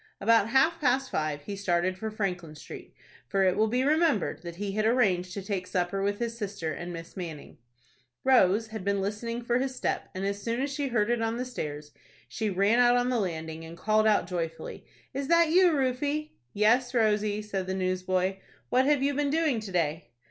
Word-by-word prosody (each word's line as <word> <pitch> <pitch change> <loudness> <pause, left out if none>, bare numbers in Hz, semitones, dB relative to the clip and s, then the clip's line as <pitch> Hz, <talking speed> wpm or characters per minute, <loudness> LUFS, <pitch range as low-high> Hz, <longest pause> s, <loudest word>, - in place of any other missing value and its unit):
About 225 0 +4
half 270 +7 +3
past 265 -1 +1
five 150 -2 -2
he 200 - -5
started 185 -1 0
for 220 +4 -4
Franklin 180 -7 -3
Street, - - -11 0.3
for 195 +6 +1
it 185 -1 +3
will 220 - +3
be 250 +4 +1
remembered 300 - +2
that 170 -1 -7
he 200 +2 -3
had 215 +2 0
arranged 195 -6 +2
to 200 - -4
take 190 -2 -3
supper 180 +1 -1
with 200 +1 0
his 235 0 -3
sister 200 -7 -4
and 175 +2 -6
Miss 165 -1 -9
Manning. 165 -8 -7 0.6
Rose 225 -4 +4
had 220 -3 -6
been 200 0 0
listening 230 +4 -3
for 240 +1 +1
his 265 0 -2
step, - - -2
and 190 +1 -3
as 200 0 -2
soon 230 +3 -2
as 280 +1 -1
she 285 -1 -1
heard 235 -3 +1
it 240 -1 0
on 225 +1 -1
the 250 - -2
stairs, 150 -11 -6 0.4
she 220 -2 -2
ran 200 +5 +2
out 245 0 +5
on 245 0 +1
the 245 - +1
landing, 160 -4 -4
and 165 +1 -10
called 215 +3 +2
out, 210 -5 +3
joyfully, 165 -2 -5 0.3
"Is 275 +1 -3
that 335 0 +4
you, 360 0 +6
Rufie?" 290 +2 -1 0.2
"Yes, 245 +5 +2
Rosie," 210 -2 +1
said 195 -3 -3
the 190 - -2
newsboy. 185 0 0 0.3
"What 255 +1 +3
have 285 -1 +3
you 285 +1 +2
been 285 0 0
doing 305 -5 +1
to 215 -3 -7
day?" 160 -5 -1
210 Hz, 205 wpm, -28 LUFS, 185-245 Hz, 0.6 s, you